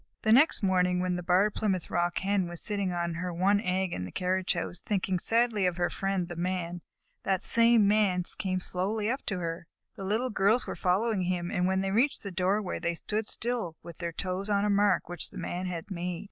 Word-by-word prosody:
The 220 - +3
next 260 0 +5
morning, 180 -1 +2
when 180 0 0
the 180 - -3
Barred 185 +4 +3
Plymouth 190 -5 -1
Rock 175 0 0
Hen 195 -1 +1
was 175 -1 -7
sitting 200 -4 -1
on 170 -1 -2
her 180 +2 -3
one 195 +4 +2
egg 185 -2 -1
in 90 - -3
the 90 - -6
carriage 185 0 0
house, 170 0 -4
thinking 190 -3 -1
sadly 225 -2 +2
of 180 -1 -2
her 175 0 0
friend, 195 -2 -1
the 175 - -7
Man, 175 0 -2 0.4
that 195 0 0
same 230 -2 +5
Man 200 -4 +3 0.2
came 185 -1 -1
slowly 205 +5 -1
up 265 - -3
to 200 - -1
her. 170 -1 -4 0.3
The 195 - -7
Little 220 +6 0
Girls 210 +4 +2
were - - -4
following 195 +1 +1
him, 175 0 -1
and 180 -4 +1
when 190 0 +1
they 195 0 -1
reached 250 +8 +1
the 200 - -5
doorway 185 +2 0
they 170 0 -1
stood 210 +5 -3
still 230 -8 -3
with 170 -2 -10
their 170 -1 -3
toes 185 +4 -3
on 200 0 +2
a 210 - +2
mark 200 -2 +3
which 175 0 -4
the 200 - -11
Man 180 +1 -3
had 170 0 -5
made. 175 -1 -3
185 Hz, 220 wpm, -29 LUFS, 180-205 Hz, 0.4 s, next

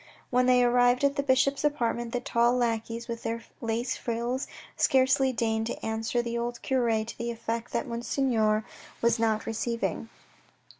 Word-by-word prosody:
When 250 0 +3
they 250 -1 +5
arrived 245 +1 +3
at 280 0 +3
the 280 - +1
bishop's 275 +1 +2
apartment, 240 -5 0
the 245 - -1
tall 240 0 +2
lackeys 230 -1 -1
with 230 -1 -5
their 230 0 -3 0.2
lace 230 +2 -1
frills 240 +3 -2 0.3
scarcely 265 0 +3
deigned 225 -2 0
to - - -5
answer 225 +2 -1
the 235 0 -2
old 240 0 -3
cure 235 -4 +1
to 230 - -8
the 235 0 -2
effect 230 0 -4
that - - 0
Monseigneur 235 -3 0 0.4
was 235 0 +3
not 220 -1 +1
receiving. 230 0 -2
235 Hz, 160 wpm, -28 LUFS, 230-250 Hz, 0.4 s, they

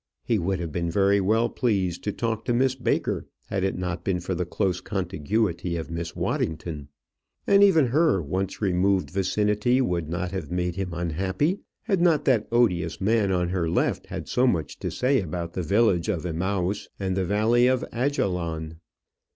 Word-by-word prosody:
He 115 -3 +1
would 95 +1 -1
have 85 -2 -4
been 85 +1 -2
very 100 +3 +3
well 110 +5 +2
pleased 100 -9 -1
to 105 - 0
talk 115 0 -2
to 120 - +1
Miss 130 +1 +3
Baker 130 -1 -1 0.2
had 95 -1 -1
it 95 - 0
not 90 -1 -3
been 90 -1 0
for 90 +2 -3
the 90 0 -2
close 90 0 -1
contiguity 90 -1 -1
of 80 0 -6
Miss 85 0 -4
Waddington; 80 -2 -2 0.6
and 200 0 +5
even 165 -8 +6
her 145 - +3
once 95 +7 -3
removed 95 -4 +2
vicinity 105 +6 +1
would 85 - 0
not 90 +1 -2
have 95 -7 -4
made 90 -1 -1
him 95 -2 -3
unhappy 95 - -1 0.2
had 195 -6 +1
not 160 -4 +3
that 120 -5 +2
odious 90 -9 +2
man 105 0 +2
on 90 -2 +1
her 90 -3 -1
left 85 - 0
had - - -6
so 125 +1 +2
much 80 - -1
to - - -3
say 130 -1 +1
about 85 -1 -5
the 90 - -2
village 100 0 +2
of 90 -5 -1
Emmaus 95 +3 -1
and 95 -2 -1
the 95 - +1
Valley 110 +6 +3
of 130 -1 +1
Ajalon. 90 - -1
95 Hz, 180 wpm, -25 LUFS, 85-115 Hz, 0.6 s, even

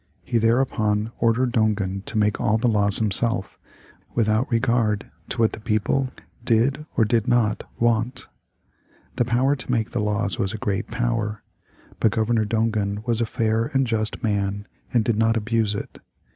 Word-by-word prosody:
He 120 -2 0
thereupon 110 -2 +1
ordered 120 +2 +2
Dongan 105 -4 0
to 110 - -3
make 105 -1 +1
all 110 - +2
the 120 +2 +1
laws 105 -2 +2
himself, 110 -1 0 0.6
without 110 +1 +1
regard 115 -3 +1 0.2
to - - -4
what 115 -2 +3
the - - -7
people 115 +4 0 0.3
did 130 +7 +1
or 115 - +5
did 115 +1 +1
not 120 -4 +1
want. 120 +2 0 0.9
The 120 - +2
power 125 +4 +2
to 130 -2 -6
make 115 -3 0
the 120 - -1
laws 105 -1 0
was 95 +2 0
a - - -3
great 105 +1 -2
power, 115 -3 -2 0.6
but 110 - +3
Governor 110 0 +1
Dongan 105 -1 -1
was 120 -1 0
a 115 - 0
fair 115 -1 0
and 135 0 +3
just 110 +1 -1
man 100 -1 -1 0.2
and 115 -3 +2
did 115 -3 +1
not 115 +1 +3
abuse 110 -1 0
it. - - -7
110 Hz, 165 wpm, -23 LUFS, 105-120 Hz, 0.9 s, or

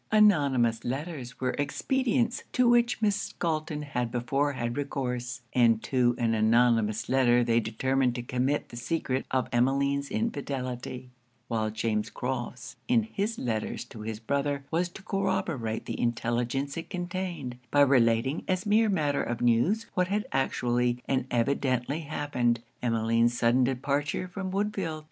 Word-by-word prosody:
Anonymous 140 - +4
letters 135 -1 -5
were 130 -1 0
expedients 245 - 0
to 250 -1 +4
which 240 -1 +3
Miss 205 -1 0
Galton 155 -2 -2
had 125 -5 -2
before 135 +5 0
had 120 -2 -3
recourse, 125 -3 -3
and 115 -3 +4
to 125 -2 +2
an 115 -1 +1
anonymous 115 -1 +3
letter 125 -2 +4
they 115 -1 +3
determined 125 +3 0
to 120 - -4
commit 130 +4 -1
the 120 - -9
secret 130 +1 -2
of 130 -1 0
Emmeline's 140 +3 +1
infidelity 130 - -3 0.4
while 110 -2 0
James 110 0 -1
Crofts, 125 -2 -5
in 235 -2 +4
his 220 +1 -3
letters 110 -3 -2
to 110 - -11
his 110 0 -5
brother, 140 +3 -1
was 175 +2 +1
to 190 +3 -12
corroborate 165 - -1
the - - -4
intelligence 120 +4 -1
it 165 - -6
contained, 175 -8 -4
by 145 - +4
relating 130 0 +3
as 185 0 0
mere 215 +1 +4
matter 150 -7 +1
of 120 - -3
news 120 - +2
what 180 -1 +1
had 205 +2 -1
actually 125 -2 +1
and 130 -1 0
evidently 130 +3 0
happened, 135 -6 -1 0.2
Emmeline's 115 0 +2
sudden 120 +2 +3
departure 140 +6 -1
from 190 +1 -5
Woodfield. 195 -5 -2
130 Hz, 145 wpm, -28 LUFS, 120-165 Hz, 0.4 s, Anonymous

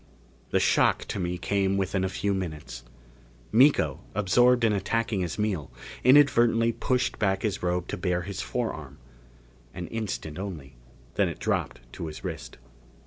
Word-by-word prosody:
The - - +2
shock - - +3
to - - -3
me 90 0 -2
came 100 +1 0
within 95 0 0
a 95 - 0
few 100 +2 -1
minutes. 80 -10 -5 0.7
Miko, 110 - +4 0.2
absorbed 120 +5 +4
in 110 -2 +4
attacking 115 +2 -1
his 85 -3 -3
meal, 100 -9 -1 0.3
inadvertently 120 -4 +5
pushed 125 +2 -1
back 95 -3 +1
his 105 -3 -1
robe 90 0 -1
to - - -3
bare 90 -1 -1
his 100 0 -5
forearm. 80 - -4 0.8
An 90 - -5
instant 100 -8 -4
only, 80 -10 -7 0.4
then - - +3
it - - -6
dropped - - -2
to 85 - -5
his 75 - -8
wrist. - - -6
95 Hz, 150 wpm, -27 LUFS, 90-115 Hz, 0.8 s, inadvertently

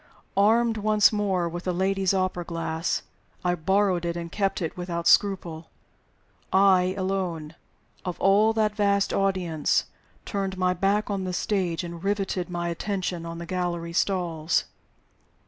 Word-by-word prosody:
Armed 225 +3 +3
once 215 0 +4
more 195 -4 0
with 175 +1 -6
the 185 - +1
lady's 190 +1 +1
opera 185 -2 0
glass 165 -1 -2 0.4
(I 175 - +3
borrowed 185 +1 +1
it 170 0 -2
and 170 -1 -6
kept 195 -1 0
it 165 -3 -3
without 175 -2 -3
scruple), 170 -5 +2 0.8
I 190 -1 +4
alone, 185 -5 -2 0.5
of 180 -2 -4
all 205 +3 +4
that 215 -1 +1
vast 200 -1 +2
audience, 185 -6 +1 0.4
turned 195 -2 -3
my 185 0 +2
back 200 +4 +1
on 195 -1 -2
the 180 - -3
stage, 180 -3 -1
and 170 0 -7
riveted 195 -2 -1
my 175 -1 -2
attention 180 -1 -3
on 165 0 -6
the 170 - -6
gallery 170 -1 -3
stalls. 170 -4 0
185 Hz, 145 wpm, -26 LUFS, 170-195 Hz, 0.8 s, once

